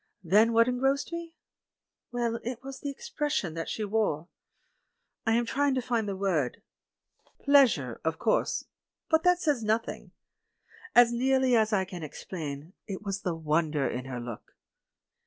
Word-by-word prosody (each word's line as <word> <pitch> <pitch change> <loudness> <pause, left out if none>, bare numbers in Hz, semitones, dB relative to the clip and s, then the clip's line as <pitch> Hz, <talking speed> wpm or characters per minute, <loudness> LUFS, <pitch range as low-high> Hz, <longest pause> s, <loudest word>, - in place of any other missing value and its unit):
Then 210 +7 +4
what 230 +1 +5
en 250 0 -1
grossed 270 +4 +1
me? 335 -1 -6 0.8
Well, 235 -1 -1
it 245 +1 -5
was 270 0 -7
the 285 - -4
expression 290 - -2
that 165 0 -4
she 220 - -3
wore. 195 -6 0 1.0
I 225 - +4
am 235 +1 +2
trying 280 +3 +1
to 255 - 0
find 230 -4 0
the 195 - -2
word. 180 -10 -1 0.8
"Pleas 280 - +6
ure," 125 -5 -7
of 160 0 -1
course 220 - +1 0.2
— - - -62
but 320 0 +5
that 360 0 +4
says 295 -9 +1
nothing. 220 +2 -1 0.9
As 240 -1 +7
near 265 +2 +2
ly 260 -1 +2
as 220 -2 +4
I 190 -3 +2
can 180 -2 -8
explain, 155 0 -6
it 195 0 -5
was 200 -1 -3
the 180 -3 -2
wonder 155 -2 0
in 125 +1 -4
her 130 -2 -5
look. 120 -2 -8
220 Hz, 170 wpm, -29 LUFS, 165-260 Hz, 1.0 s, As